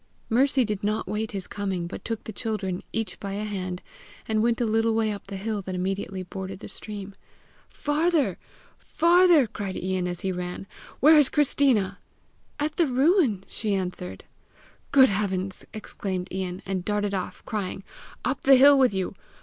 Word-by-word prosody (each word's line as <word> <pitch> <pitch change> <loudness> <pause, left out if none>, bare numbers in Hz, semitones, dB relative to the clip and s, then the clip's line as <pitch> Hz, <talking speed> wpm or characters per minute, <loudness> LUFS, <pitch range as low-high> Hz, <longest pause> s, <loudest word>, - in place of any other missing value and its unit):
Mercy 265 +2 +3
did 210 -2 -3
not 215 +2 -1
wait 215 +1 -2
his 195 -2 -4
coming, 195 -4 -3
but 170 - -7
took 225 -1 -4
the 220 - -7
children, 200 -5 -3
each 225 0 -3
by 195 -1 -5
a 205 +1 -3
hand, 185 -4 -4 0.4
and 220 -1 +1
went 235 0 +2
a 240 - +1
little 225 0 +2
way 220 -1 +1
up 205 - -7
the 195 - -5
hill 210 +1 -2
that 185 -1 -5
immediately 190 0 -3
bordered 190 +1 -6
the 195 - -9
stream. 205 -2 -8 0.6
"Farther! 295 - +1 0.4
farther!" 340 -3 +5
cried 200 -3 -5
Ian 185 -1 -1
as 175 -1 -5
he 190 - -1
ran. 180 +1 -5 0.4
"Where 305 +3 +8
is 285 - +5
Christina?" 255 -9 +2 0.6
"At 300 +1 -2
the 335 - +3
ruin," 265 - +3
she 210 -3 -1
answered. 180 -1 -4 0.7
"Good 265 -2 +7
heavens!" 195 -2 -1
exclaimed 190 -3 -4
Ian, 185 0 -4
and 190 -2 -2
darted 205 0 -1
off, 190 - -4
crying, 200 -4 -3 0.4
"Up - - -1
the 270 0 +7
hill 280 +2 +7
with 250 -7 +4
you! 190 0 -2
205 Hz, 170 wpm, -26 LUFS, 190-250 Hz, 0.7 s, Where